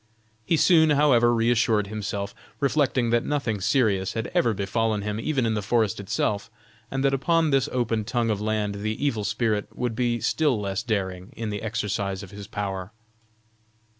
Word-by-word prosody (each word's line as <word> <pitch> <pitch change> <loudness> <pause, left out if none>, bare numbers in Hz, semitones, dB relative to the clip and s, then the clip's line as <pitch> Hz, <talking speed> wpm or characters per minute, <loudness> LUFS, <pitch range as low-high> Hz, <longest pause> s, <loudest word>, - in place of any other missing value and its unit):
He 165 - +1
soon, 160 -1 +5
however, 140 -5 +4
reassured 115 -2 +2
himself, 100 -1 -4 0.3
reflecting 135 -4 +1
that 120 0 +3
nothing 125 -9 -1
serious 100 -5 +1
had 115 0 -3
ever 120 - +3
befallen 105 +1 -1
him 105 +1 -3
even 135 -1 0
in 110 - +1
the 105 - -1
forest 105 -1 +1
itself, 100 +1 -1 0.4
and 135 +2 -1
that 135 - +3
upon 160 +3 +2
this 135 +1 +2
open 115 -3 0
tongue 115 0 0
of 105 -1 -2
land 105 -2 -1
the 110 +1 -2
evil 115 -7 0
spirit 105 0 0
would 125 -2 -1
be 120 0 0
still 145 -5 +1
less 100 0 -2
daring 95 -5 -3
in 115 -2 -4
the 105 - -4
exercise 105 -3 -2
of 95 - -11
his 100 -1 -9
power. 100 -2 -4
110 Hz, 170 wpm, -25 LUFS, 105-125 Hz, 0.4 s, soon